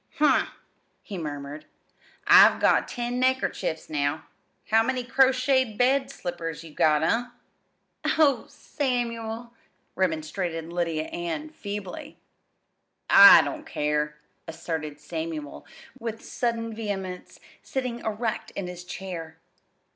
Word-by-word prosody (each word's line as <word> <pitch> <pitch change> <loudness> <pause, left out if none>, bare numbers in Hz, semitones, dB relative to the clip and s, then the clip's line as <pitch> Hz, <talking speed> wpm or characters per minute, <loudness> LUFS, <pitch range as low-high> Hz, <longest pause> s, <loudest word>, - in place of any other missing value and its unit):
"Hm!" 295 -3 +4 0.6
he 205 - -8
murmured. 145 -1 -6 0.6
"I've - - +8
got - - +3
ten 245 0 -3
neckerchiefs 260 -10 0
now. 145 0 -1 0.5
How 225 +1 +6
many 250 +2 -1
crocheted 260 -2 +2
bed 265 +2 +2
slippers 165 -3 -5
you 160 -2 -12
got? 150 0 +3
eh?" 230 +9 +1 0.9
"Oh, 280 -7 +3
Samuel!" 235 -3 -3 0.4
remonstrated 165 -1 -2
Lydia 165 -3 -1
Ann 175 - -5
feebly. 205 - -7 0.9
"I - - +10
don't - - -6
care," 150 0 -1 0.3
asserted 160 -2 -5
Samuel 160 -2 -6 0.3
with 225 -2 -6
sudden 230 -2 -2
vehemence, 195 -4 -5 0.2
sitting 250 -3 -3
erect 220 0 -3
in 195 - -3
his 180 0 -7
chair. 175 -3 -7
195 Hz, 105 wpm, -26 LUFS, 160-240 Hz, 0.9 s, I